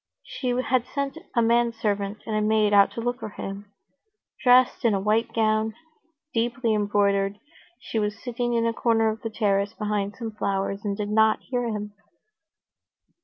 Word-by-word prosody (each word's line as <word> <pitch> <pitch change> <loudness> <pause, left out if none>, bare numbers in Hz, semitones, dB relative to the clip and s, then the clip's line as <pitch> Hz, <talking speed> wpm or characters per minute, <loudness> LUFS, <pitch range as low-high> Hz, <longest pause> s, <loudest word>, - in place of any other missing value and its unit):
She 255 - -6
had 250 0 +1
sent 280 +2 -3 0.2
a 235 - +4
manservant 225 -3 0
and 220 - -3
a 215 - +1
maid 215 -1 +2
out 200 -1 +6
to 230 - -4
look 245 +2 -2
for - - -5
him. 200 0 -7 0.7
Dressed 250 0 +5
in 225 -4 +3
a - - 0
white 220 +3 +1
gown, 220 -1 +1 0.6
deeply 235 0 0
embroidered, 200 -1 +1 0.4
she 225 - -3
was 210 0 -1
sitting 240 0 -2
in 230 0 +2
a 230 - +1
corner 225 -1 +2
of 220 +1 -4
the 225 - -3
terrace 205 -1 0
behind 210 -1 -2
some 230 -2 -5
flowers, 195 -1 -2
and 200 -2 -2
did 210 -1 -3
not 220 0 +3
hear 245 -2 -2
him. 210 -2 -4
220 Hz, 170 wpm, -25 LUFS, 205-235 Hz, 0.7 s, out